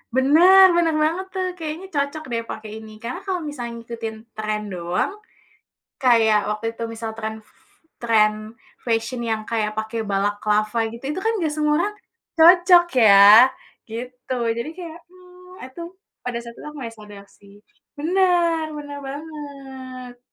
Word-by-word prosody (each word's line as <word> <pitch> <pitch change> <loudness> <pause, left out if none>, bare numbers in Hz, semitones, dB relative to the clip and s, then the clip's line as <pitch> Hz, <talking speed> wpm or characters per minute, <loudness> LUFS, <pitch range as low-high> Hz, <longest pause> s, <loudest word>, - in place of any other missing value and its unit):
Benar, 355 +8 +7
benar 330 -2 +2
banget. 340 +5 0
tuh. 370 0 -1
Kayaknya 320 +4 -5
cocok, 285 +2 -2
deh, 230 0 -1
pakai 215 -1 -8
ini. 220 0 -12
Karena, 245 +10 -5
kalau 365 -2 -1
misalnya 250 -6 -6
ngikutin 230 -1 -6 0.2
tren 215 -1 -2
doang, 175 - -2 0.9
kayak 225 -4 +4
waktu 210 +2 -3
itu 230 - -6
misal 225 0 -5
tren 220 0 -5
f - - -28 0.5
tren 215 -1 +1 0.3
fashion 230 +1 -1
yang 225 -2 -2
kayak 215 -2 -2
pakai 220 +1 -3
balaclava, 210 +2 0
gitu, 235 +3 -11
itu, 340 - -4
kan, 450 - +2
enggak 320 -6 -1
semua 300 0 +1
orang 415 +4 -1 0.4
cocok, 350 +1 +7
ya. 205 -4 +7 0.7
Gitu. 250 +3 -6 0.2
Jadi, 235 +6 -3
kayak, 335 -2 -8
mmm, 365 0 -17
aduh. 335 +7 -8 0.4
Pada 245 -1 -3
saat 235 0 -11
itu, - - -12
aku 300 0 -9
enggak 230 -1 -7
sadar, 205 -1 -12
sih. 200 -1 -19 0.5
Benar, 345 -1 +2
benar 290 -1 -7
banget. 270 -4 -9
255 Hz, 150 wpm, -22 LUFS, 220-325 Hz, 0.9 s, Benar